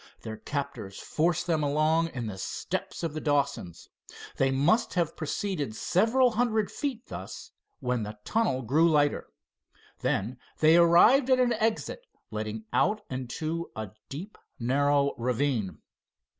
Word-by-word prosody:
Their 110 -1 -6
captors 135 -9 -5
forced 170 +2 0
them 165 -3 +1
along 155 +3 +2
in 125 -7 -5
the 100 -3 -6
steps - - -4
of 165 -3 -2
the 155 - -4
Dawsons. 140 - -1 0.5
They 135 - +3
must 150 - +2
have 170 -3 0
proceeded 155 - -3
several 235 - +3
hundred 220 -2 +1
feet 270 -5 -4
thus, - - -8 0.3
when 125 -2 0
the 105 0 -6
tunnel 175 - +1
grew 155 +8 +3
lighter. 145 -2 +2 0.7
Then 120 +6 -1 0.2
they 155 +1 +5
arrived 175 +11 +6
at 260 -1 +5
an 245 -1 +3
exit 225 - -2 0.2
letting 110 0 -4
out 210 +3 +2
into 155 +6 -3
a 110 -3 -5 0.2
deep, 180 +10 -8 0.2
narrow 140 +3 +2
ravine. 120 - 0
150 Hz, 135 wpm, -28 LUFS, 125-185 Hz, 0.7 s, arrived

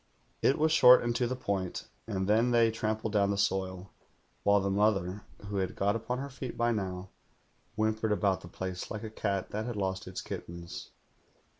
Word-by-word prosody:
"It 135 - +3
was 155 +1 +3
short 125 -5 +8
and 120 0 0
to 125 - +1
the 130 - -2
point; 100 -7 -3 0.2
and 95 -3 -2
then 110 +4 +4
they 115 -2 +4
trampled 110 0 -2
down 100 -1 +3
the 100 - 0
soil, 95 -1 -1 0.5
while 100 0 +4
the 100 0 -1
mother, 100 -1 +1 0.2
who 100 0 -3
had 95 -1 -1
got 100 +2 +1
upon 115 +2 -2
lier 140 +2 -4
feet 130 -1 -7
by 120 0 +2
now, 95 -3 -3 0.7
whimpered 110 0 0
about 100 -2 +1
the - - -10
place 90 +1 -5
like 110 0 -5
a 110 - -6
cat 100 -3 -2
that 110 +1 -2
had 120 - -3
lost 95 -2 -2
its - - -5
kittens. 85 0 -7
105 Hz, 190 wpm, -30 LUFS, 95-115 Hz, 0.7 s, short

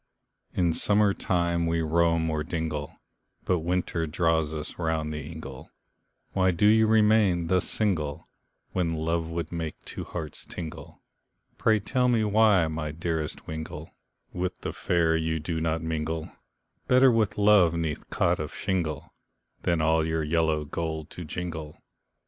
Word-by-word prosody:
In 85 -2 +2
summer 105 +3 +3
time 85 -3 0
we 85 0 +1
roam 85 0 +2
o'er 75 -1 -1
dingle, 80 -3 -4 0.5
But 90 - +2
winter 85 -1 -1
draws 80 -1 +1
us 75 +1 -6
round 80 -2 -1
the 75 -1 -5
ingle, 75 -4 -9 0.6
Why 95 -1 +2
do 90 +3 +2
you 110 +1 +6
remain 105 -6 +4
thus 90 0 +2
single, 80 -8 -1 0.4
When 85 -3 0
love 80 +1 -1
would 85 -1 -4
make 80 -2 -4
two - - -5
hearts 80 -3 -6
tingle, 80 -1 -8 0.6
Pray, 110 -1 +3
tell 125 +5 +1
me 115 -3 +3
why 105 -4 +4
my 80 -1 -3
dearest 80 -1 -3
wingle, 80 0 -6 0.4
With 90 +1 -3
the - - -4
fair 85 -2 +1
you 80 0 0
do 80 +1 -3
not 80 0 -1
mingle, 80 0 -3 0.6
Better 130 +1 +6
with 110 -4 +1
love 100 -5 +5
'neath 80 -3 -3
cot - - +1
of - - -5
shingle, 85 -6 -2 0.5
Than 85 -2 +1
all 80 0 +3
your 80 0 -1
yellow 80 -1 +1
gold 80 0 -4
to 90 - -7
jingle. 80 -1 -5
80 Hz, 150 wpm, -27 LUFS, 80-90 Hz, 0.6 s, you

